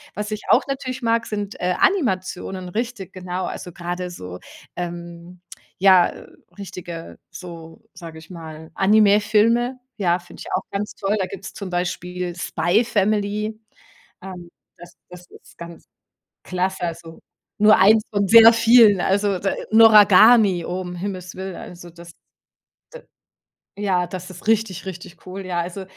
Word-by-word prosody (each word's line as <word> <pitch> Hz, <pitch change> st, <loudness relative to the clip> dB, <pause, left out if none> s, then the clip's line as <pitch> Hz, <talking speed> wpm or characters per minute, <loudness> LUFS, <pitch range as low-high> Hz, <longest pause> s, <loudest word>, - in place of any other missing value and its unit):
was 210 Hz, +1 st, -5 dB
ich 215 Hz, -, -5 dB
auch -, -, +5 dB
natürlich 260 Hz, -1 st, -5 dB
mag, 230 Hz, 0 st, 0 dB
sind, 205 Hz, -1 st, -5 dB
äh, 180 Hz, 0 st, -1 dB
Animationen, 190 Hz, -, -1 dB
richtig 225 Hz, -2 st, -5 dB
genau. 185 Hz, 0 st, -5 dB
Also, 180 Hz, -, -7 dB
grade 180 Hz, 0 st, -5 dB
so, 90 Hz, -, -9 dB, 0.4 s
ähm, 175 Hz, 0 st, -8 dB, 0.4 s
ja, 185 Hz, -2 st, +5 dB
äh, -, -, -11 dB, 0.3 s
richtige, 175 Hz, -4 st, -9 dB
so, 165 Hz, -2 st, -11 dB
sage 165 Hz, -2 st, -11 dB
ich 160 Hz, -, -17 dB
mal, 160 Hz, -2 st, -10 dB
Animefilme. 215 Hz, +4 st, +3 dB, 0.2 s
Ja, 180 Hz, -3 st, +1 dB
finde 175 Hz, -, -15 dB
ich -, -, -9 dB
auch -, -, 0 dB
ganz 200 Hz, +1 st, -4 dB
toll. 205 Hz, +2 st, -1 dB
Da 190 Hz, -, 0 dB
gibt's 195 Hz, -1 st, -9 dB
zum 195 Hz, -3 st, -7 dB
Beispiel 180 Hz, 0 st, -4 dB
„Spy 190 Hz, +5 st, 0 dB
Family“. 210 Hz, +1 st, -1 dB, 0.6 s
Ähm, 180 Hz, -2 st, -10 dB, 0.3 s
das 175 Hz, 0 st, -14 dB, 0.2 s
das 180 Hz, 0 st, -13 dB
ist -, -, -18 dB
ganz 170 Hz, 0 st, -11 dB, 0.6 s
klasse. 185 Hz, +1 st, -3 dB
Also, 165 Hz, -1 st, -6 dB, 0.4 s
nur 215 Hz, 0 st, +7 dB
eins 215 Hz, +3 st, +5 dB
von 200 Hz, -1 st, 0 dB
sehr 230 Hz, +2 st, +8 dB
vielen. 225 Hz, -4 st, +5 dB
Also, 200 Hz, 0 st, 0 dB
d 195 Hz, -, -1 dB, 0.2 s
„Noragami“ 215 Hz, -3 st, +6 dB
oh, 180 Hz, +1 st, -4 dB
um 180 Hz, -1 st, -7 dB
Himmels 185 Hz, -1 st, -6 dB
Willen, 190 Hz, -1 st, -6 dB
also 175 Hz, -1 st, -11 dB
das, 170 Hz, 0 st, -14 dB, 1.6 s
d 205 Hz, -, -7 dB
ja, 180 Hz, -3 st, 0 dB
das 185 Hz, 0 st, -8 dB
ist 185 Hz, +3 st, -13 dB
richtig, 215 Hz, -5 st, 0 dB
richtig 180 Hz, -1 st, -10 dB
cool. 190 Hz, +1 st, -7 dB
Ja, 175 Hz, -1 st, -2 dB
also 180 Hz, +3 st, -6 dB
185 Hz, 150 wpm, -21 LUFS, 175-210 Hz, 1.6 s, sehr